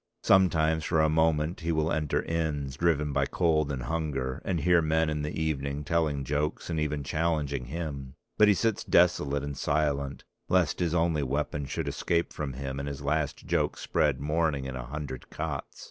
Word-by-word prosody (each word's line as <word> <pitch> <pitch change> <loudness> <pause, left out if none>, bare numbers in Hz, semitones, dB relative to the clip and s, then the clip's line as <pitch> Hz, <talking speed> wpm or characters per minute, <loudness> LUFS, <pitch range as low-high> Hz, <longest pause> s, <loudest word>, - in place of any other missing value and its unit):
Sometimes 80 -4 +4
for 80 +1 +1
a 80 0 +4
moment 80 +1 +2
he 85 +1 -1
will 80 0 +1
enter 75 -1 0
inns, 75 -5 -2
driven 75 -3 +1
by - - +1
cold 80 -4 +1
and 65 -3 -3
hunger, 70 -4 -2
and 90 -3 -1
hear 90 +1 +4
men 80 0 +1
in 75 -1 -2
the 75 +2 -3
evening 70 -2 -2
telling 75 -2 0
jokes 75 +5 -2
and 80 - -1
even 75 -1 -1
challenging 75 -4 -1
him; 70 -2 -5 0.2
but 105 - +6
he 105 - +5
sits 110 +1 0
desolate 75 -5 +3
and 70 -1 -4
silent, 70 -1 0 0.3
lest 90 -4 +2
his 85 -2 0
only 80 -2 +2
weapon 70 +1 -2
should - - -3
escape 85 0 0
from 70 -3 -4
him 65 +1 -4
and 70 - -4
his 70 0 -6
last 70 0 -1
joke - - 0
spread - - +1
mourning 75 -1 0
in 65 -1 -5
a - - -6
hundred 70 -2 -6
cots. 75 -3 -5
75 Hz, 185 wpm, -28 LUFS, 70-80 Hz, 0.3 s, but